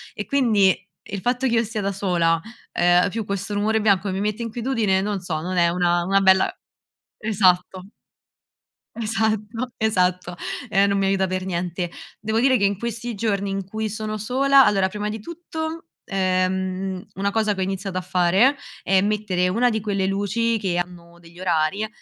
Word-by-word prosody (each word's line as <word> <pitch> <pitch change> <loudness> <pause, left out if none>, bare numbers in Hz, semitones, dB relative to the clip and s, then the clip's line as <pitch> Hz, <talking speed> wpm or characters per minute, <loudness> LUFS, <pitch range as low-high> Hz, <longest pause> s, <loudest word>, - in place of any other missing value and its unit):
e 210 - -4
quindi 220 -9 +3 0.3
il 200 - -5
fatto 250 +2 0
che 235 - 0
io 230 - +3
stia 220 -1 -4
da 200 0 -1
sola, 175 -4 +1 0.3
ehm, 175 +2 +3
più 225 +1 -3
questo 200 +1 -3
rumore 215 +2 +1
bianco 200 -2 +2
che 190 - -1
mi 195 - -2
mette 210 +2 -2
inquietudine, 230 -4 0
non 205 0 -2
so, 170 -4 -3
non 180 +2 -3
è 170 -1 +4
una 175 0 +1
una 195 +2 +3
bella 190 0 +4 0.7
esatto. 185 -4 +2 1.1
Esatto, 220 +1 -1
esatto, 180 -5 0 0.3
e 200 -1 +3
non 200 0 +1
mi 195 - +1
aiuta 195 0 +2
per 185 0 -3
niente. 175 -1 -3 0.3
Devo 220 +1 0
dire 260 0 +4
che 200 - +1
in 200 -1 +1
questi 235 +1 -4
giorni 200 -1 -1
in 195 0 -3
cui 215 +3 -3
sono 215 0 -4
sola 270 +5 +4
allora 195 -2 +2
prima 210 +1 -4
di 215 +1 -4
tutto, 320 +4 -6 0.2
ehm, 185 0 -1
una 200 +1 -1
cosa 215 0 +1
che 190 - -5
ho - - +1
iniziato 195 0 -3
a 185 - -1
fare, 185 +10 +3 0.3
è 190 -1 +3
mettere 200 -3 0
una 240 +6 +2
di 220 - -1
quelle 200 -2 -1
luci 215 +4 0
che 190 -4 -1
hanno 175 -1 -5
degli 170 +1 -15
orari 185 +4 0
200 Hz, 180 wpm, -23 LUFS, 185-220 Hz, 1.1 s, è